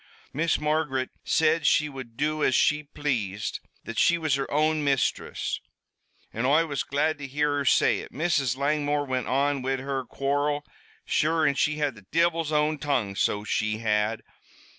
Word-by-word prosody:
"Miss 160 Hz, +3 st, +1 dB
Margaret 150 Hz, -4 st, 0 dB
said 160 Hz, -1 st, +2 dB
she 150 Hz, -, +4 dB
would 130 Hz, -5 st, -9 dB
do 155 Hz, +1 st, 0 dB
as 130 Hz, -, +3 dB
she 150 Hz, 0 st, +3 dB
pl'ased 120 Hz, -9 st, -3 dB, 0.2 s
that 115 Hz, -, -4 dB
she 170 Hz, -, +4 dB
was 155 Hz, -4 st, 0 dB
her 135 Hz, 0 st, -1 dB
own 155 Hz, +1 st, +1 dB
mistress 140 Hz, -2 st, -1 dB, 0.7 s
an' 115 Hz, -, -2 dB
Oi 155 Hz, +4 st, +4 dB
was 145 Hz, -4 st, -2 dB
glad 145 Hz, +2 st, 0 dB
to 145 Hz, -, -6 dB
hear 145 Hz, +2 st, 0 dB
her 140 Hz, -, -1 dB
say -, -, +4 dB
it. -, -, -9 dB
Mrs. 140 Hz, -5 st, 0 dB
Langmore 145 Hz, +1 st, 0 dB
went 130 Hz, -2 st, -2 dB
on 140 Hz, +1 st, +1 dB
wid 135 Hz, +1 st, -1 dB
her 135 Hz, 0 st, -3 dB
quarrel 145 Hz, +4 st, -1 dB, 0.4 s
sure, 160 Hz, +1 st, +2 dB
an' 145 Hz, -, +3 dB
she 150 Hz, +2 st, +1 dB
had 145 Hz, -2 st, -1 dB
the 105 Hz, -4 st, -17 dB
divil's 165 Hz, -1 st, +1 dB
own 150 Hz, 0 st, +1 dB
tongue, 125 Hz, -10 st, -1 dB
so 105 Hz, +1 st, 0 dB
she 110 Hz, 0 st, -1 dB
had. 110 Hz, 0 st, 0 dB
145 Hz, 170 wpm, -26 LUFS, 130-150 Hz, 0.7 s, she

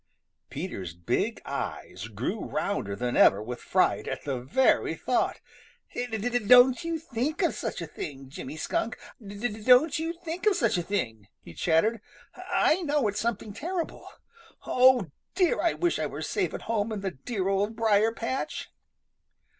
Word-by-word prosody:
Peter's 125 Hz, -, -5 dB
big 85 Hz, 0 st, -1 dB
eyes 100 Hz, +4 st, -5 dB
grew 120 Hz, -, -3 dB
rounder 100 Hz, -, -2 dB
than 125 Hz, +3 st, -2 dB
ever 100 Hz, -, +6 dB
with 120 Hz, +3 st, -6 dB
fright -, -, +1 dB
at -, -, -4 dB
the 135 Hz, -3 st, -2 dB
very 200 Hz, -, +2 dB
thought. -, -, 0 dB, 0.5 s
"D 245 Hz, -, -2 dB
d 240 Hz, +2 st, -1 dB
don't 250 Hz, +6 st, +6 dB
you 335 Hz, 0 st, -1 dB
think 300 Hz, -, -2 dB
of 340 Hz, -, +2 dB
such 215 Hz, -6 st, -4 dB
a -, -, -3 dB
thing, 140 Hz, -3 st, -7 dB
Jimmy 135 Hz, +2 st, -8 dB
Skunk 230 Hz, +9 st, -2 dB, 0.3 s
I -, -, -11 dB
D 200 Hz, +1 st, -8 dB
d 215 Hz, -1 st, -8 dB
don't 255 Hz, +7 st, +6 dB
y -, -, -2 dB
y 320 Hz, -, -2 dB
you 335 Hz, -, -2 dB
think 345 Hz, +3 st, -5 dB
of 415 Hz, -, +5 dB
such 230 Hz, -, +2 dB
a -, -, 0 dB
thing!" 115 Hz, -, -3 dB, 0.2 s
he 85 Hz, -, -11 dB
chattered. 180 Hz, -, +2 dB, 0.3 s
"I 345 Hz, +5 st, +1 dB
know 295 Hz, -7 st, +1 dB
it's 205 Hz, 0 st, -2 dB
something 225 Hz, -2 st, -2 dB
terrible. 335 Hz, -, -4 dB, 0.6 s
Oh, 250 Hz, -, +4 dB, 0.2 s
dear! 365 Hz, -2 st, +2 dB
I 340 Hz, -, +2 dB
wish 345 Hz, -1 st, 0 dB
I -, -, 0 dB
were -, -, -6 dB
safe 395 Hz, -3 st, -1 dB
at -, -, -7 dB
home 225 Hz, -1 st, -1 dB
in 210 Hz, -2 st, -3 dB
the 195 Hz, -1 st, -2 dB
dear 185 Hz, -, -3 dB
Old 200 Hz, +3 st, 0 dB
Briar 220 Hz, -1 st, +3 dB
patch." 235 Hz, +3 st, -4 dB
220 Hz, 180 wpm, -27 LUFS, 160-260 Hz, 0.6 s, ever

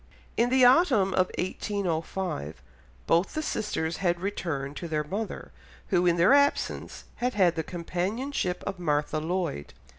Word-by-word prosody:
In 235 Hz, +1 st, +2 dB
the 260 Hz, 0 st, +5 dB
autumn 245 Hz, -, +5 dB
of 185 Hz, 0 st, +2 dB
1805 180 Hz, -, -3 dB, 0.5 s
both 170 Hz, +3 st, +2 dB
the 310 Hz, -, -1 dB
sisters 170 Hz, -, -2 dB
had 175 Hz, -2 st, 0 dB
returned 160 Hz, -8 st, -3 dB
to 170 Hz, -, -5 dB
their 155 Hz, -2 st, -1 dB
mother, 195 Hz, -, -5 dB, 0.4 s
who 180 Hz, +1 st, +3 dB
in 175 Hz, 0 st, +3 dB
their 175 Hz, +9 st, +5 dB
absence 285 Hz, 0 st, +1 dB
had 250 Hz, -1 st, -1 dB
had 185 Hz, -4 st, +4 dB
the 160 Hz, -, 0 dB
companionship 180 Hz, -, -3 dB
of 195 Hz, -2 st, -4 dB
Martha 150 Hz, -2 st, 0 dB
Lloyd. 165 Hz, -, -3 dB
180 Hz, 145 wpm, -27 LUFS, 165-210 Hz, 0.5 s, the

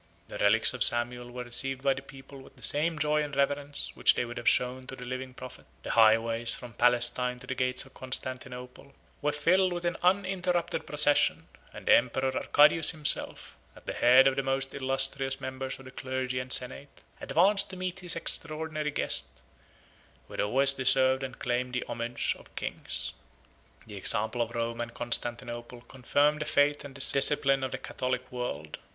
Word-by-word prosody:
The -, -, -8 dB
relics -, -, +4 dB
of -, -, +2 dB
Samuel 120 Hz, +1 st, +1 dB
were 125 Hz, 0 st, -7 dB
received 130 Hz, +2 st, +1 dB
by 135 Hz, -1 st, +3 dB
the 130 Hz, -, -8 dB
people 135 Hz, 0 st, -13 dB
with -, -, -17 dB
the -, -, -13 dB
same 155 Hz, +2 st, +2 dB
joy 150 Hz, 0 st, +1 dB
and 145 Hz, -2 st, -5 dB
reverence 140 Hz, +1 st, -1 dB
which -, -, +3 dB
they -, -, -1 dB
would 120 Hz, +1 st, -8 dB
have -, -, +3 dB
shown 130 Hz, +1 st, 0 dB
to 135 Hz, -, -6 dB
the 125 Hz, -, -9 dB
living 130 Hz, +1 st, -6 dB
prophet; 130 Hz, -1 st, -11 dB, 0.2 s
the -, -, -4 dB
highways, 115 Hz, +1 st, +3 dB
from 120 Hz, -2 st, -10 dB
Palestine 125 Hz, +2 st, +3 dB
to 125 Hz, -, -12 dB
the 130 Hz, -, -4 dB
gates 125 Hz, 0 st, +1 dB
of 135 Hz, -, -17 dB
Constantinople, 130 Hz, +1 st, -7 dB, 0.3 s
were 150 Hz, -, +1 dB
filled 180 Hz, +6 st, +2 dB
with 175 Hz, 0 st, -4 dB
an 170 Hz, 0 st, -1 dB
uninterrupted 180 Hz, -2 st, 0 dB
procession; 150 Hz, -1 st, +2 dB, 0.2 s
and -, -, -11 dB
the -, -, +5 dB
emperor 130 Hz, +2 st, 0 dB
Arcadius 150 Hz, +2 st, +4 dB
himself, 155 Hz, -4 st, 0 dB, 0.2 s
at -, -, -17 dB
the -, -, -4 dB
head 125 Hz, +2 st, +6 dB
of 135 Hz, -1 st, +3 dB
the -, -, +2 dB
most 135 Hz, 0 st, -1 dB
illustrious 135 Hz, 0 st, 0 dB
members 130 Hz, 0 st, -5 dB
of 135 Hz, -, -15 dB
the 130 Hz, -, -11 dB
clergy 130 Hz, -1 st, -3 dB
and 125 Hz, 0 st, -7 dB
senate, 130 Hz, +3 st, -2 dB, 0.2 s
advanced 195 Hz, +4 st, +3 dB
to 190 Hz, -, -8 dB
meet 185 Hz, 0 st, -4 dB
his 180 Hz, -2 st, +1 dB
extraordinary 155 Hz, -2 st, -2 dB
guest, 145 Hz, -, -3 dB, 0.8 s
who -, -, -15 dB
had -, -, -2 dB
always 135 Hz, +6 st, +3 dB
deserved 130 Hz, 0 st, +3 dB
and 130 Hz, -2 st, -6 dB
claimed 125 Hz, +1 st, -2 dB
the 125 Hz, -, -2 dB
homage 120 Hz, +1 st, -2 dB
of -, -, -19 dB
kings. -, -, -3 dB, 0.7 s
73 110 Hz, -, -14 dB
The -, -, -7 dB
example 110 Hz, +4 st, 0 dB
of 115 Hz, 0 st, -3 dB
Rome 115 Hz, 0 st, -3 dB
and 115 Hz, 0 st, -6 dB
Constantinople 120 Hz, 0 st, -3 dB
confirmed 145 Hz, +4 st, 0 dB
the -, -, -2 dB
faith 145 Hz, 0 st, +2 dB
and 140 Hz, -1 st, -11 dB
discipline 135 Hz, 0 st, +3 dB
of 130 Hz, -, -3 dB
the 130 Hz, -, -3 dB
Catholic 130 Hz, -1 st, -4 dB
world. 80 Hz, -12 st, -5 dB
130 Hz, 185 wpm, -28 LUFS, 125-145 Hz, 0.8 s, head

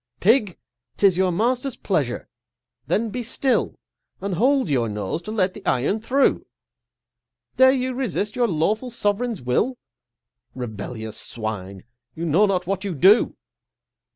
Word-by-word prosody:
Pig! 210 Hz, -2 st, +3 dB, 0.4 s
'tis 195 Hz, -3 st, +4 dB
your 185 Hz, 0 st, +2 dB
master's 245 Hz, +7 st, 0 dB
pleasureâthen 220 Hz, 0 st, -3 dB
be 245 Hz, -, -3 dB
still, 255 Hz, +2 st, 0 dB, 0.4 s
And 200 Hz, -1 st, -3 dB
hold 260 Hz, +7 st, +2 dB
your 125 Hz, -6 st, +1 dB
nose 105 Hz, -, -3 dB
to 215 Hz, -, -7 dB
let 190 Hz, -4 st, +1 dB
the 210 Hz, -, -11 dB
iron 140 Hz, -, +1 dB
through! 270 Hz, +5 st, +1 dB, 1.1 s
Dare 260 Hz, 0 st, +7 dB
you 255 Hz, -1 st, -1 dB
resist 215 Hz, -5 st, -2 dB
your 245 Hz, -1 st, +2 dB
lawful 210 Hz, +8 st, 0 dB
Sovereign's 225 Hz, -, -1 dB
will? 220 Hz, -, 0 dB, 0.8 s
Rebellious 110 Hz, -2 st, -6 dB
Swine! 100 Hz, -4 st, -5 dB, 0.3 s
you 165 Hz, -, -4 dB
know 175 Hz, +7 st, +4 dB
not 185 Hz, -2 st, 0 dB
what 195 Hz, +2 st, -2 dB
you 195 Hz, -4 st, -3 dB
do! 195 Hz, -, +5 dB
200 Hz, 130 wpm, -23 LUFS, 150-240 Hz, 1.1 s, Dare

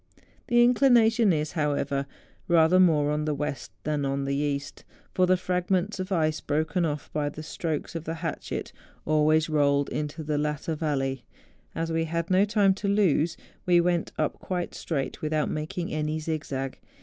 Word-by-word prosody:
The 240 Hz, -1 st, +5 dB
inclination 235 Hz, -3 st, +5 dB
is, 155 Hz, -2 st, -1 dB
however, 140 Hz, -3 st, -1 dB, 0.4 s
rather 170 Hz, +1 st, +5 dB
more 155 Hz, -5 st, +4 dB
on 150 Hz, 0 st, -1 dB
the 150 Hz, -1 st, 0 dB
west 145 Hz, 0 st, -4 dB
than 150 Hz, -1 st, -1 dB
on 140 Hz, 0 st, -1 dB
the 140 Hz, -, -1 dB
east, 140 Hz, 0 st, -3 dB, 0.3 s
for 185 Hz, -1 st, +3 dB
the 185 Hz, 0 st, +4 dB
fragments 185 Hz, +2 st, -1 dB
of 185 Hz, +1 st, -4 dB
ice 155 Hz, -3 st, +1 dB
broken 160 Hz, +4 st, 0 dB
off 150 Hz, -2 st, -4 dB
by 150 Hz, -1 st, 0 dB
the 155 Hz, +2 st, -8 dB
strokes 155 Hz, -1 st, -4 dB
of 165 Hz, -1 st, -5 dB
the 165 Hz, -, -3 dB
hatchet 165 Hz, 0 st, -5 dB, 0.3 s
always 155 Hz, +1 st, +3 dB
rolled 145 Hz, -2 st, +2 dB
into 150 Hz, +1 st, -4 dB
the 150 Hz, -1 st, -1 dB
latter 150 Hz, +2 st, -2 dB
vallej^ 135 Hz, -4 st, -1 dB, 0.5 s
As 165 Hz, 0 st, -2 dB
we 165 Hz, 0 st, 0 dB
had 170 Hz, +2 st, -3 dB
no 190 Hz, +2 st, +5 dB
time 205 Hz, -2 st, +3 dB
to 205 Hz, -, -1 dB
lose, 180 Hz, -5 st, +2 dB, 0.3 s
we 175 Hz, -1 st, +5 dB
went 175 Hz, -1 st, +1 dB
up 155 Hz, -, -1 dB
quite 180 Hz, -2 st, -3 dB
straight 140 Hz, -5 st, -3 dB
without 155 Hz, -1 st, 0 dB
making 155 Hz, +3 st, -4 dB
any 155 Hz, 0 st, -1 dB
zigzag. 145 Hz, -4 st, -4 dB
155 Hz, 170 wpm, -27 LUFS, 150-180 Hz, 0.5 s, The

